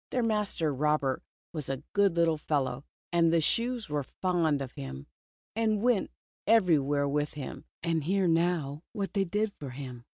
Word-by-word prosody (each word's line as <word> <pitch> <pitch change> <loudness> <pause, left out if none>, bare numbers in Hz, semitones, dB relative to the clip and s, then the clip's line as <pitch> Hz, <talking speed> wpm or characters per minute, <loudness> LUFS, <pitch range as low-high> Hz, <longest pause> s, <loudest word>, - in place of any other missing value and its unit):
Their 250 - 0
master 210 -8 +1
Robert 145 -1 +1 0.3
was 150 -5 -3
a 135 +1 -3
good 200 -3 +4
Httle 165 -2 +3
fellow, 140 -3 -1 0.3
and 170 -1 +4
the 170 - +4
shoes 235 +7 0
were 150 -1 -1
fond 165 0 0
of 135 -2 -5
him, 65 - -7 0.5
and 220 -2 +1
went 240 -5 +3 0.4
everywhere 150 -10 +4
with 145 +1 -1
him, 140 -3 -6 0.2
and 165 -2 +1
hear 190 +3 +2
now 165 -4 +1
what 200 -4 -3
they 195 -2 +2
did 210 +3 0
for 140 - -5
him. 125 -2 -8
165 Hz, 165 wpm, -30 LUFS, 140-195 Hz, 0.5 s, good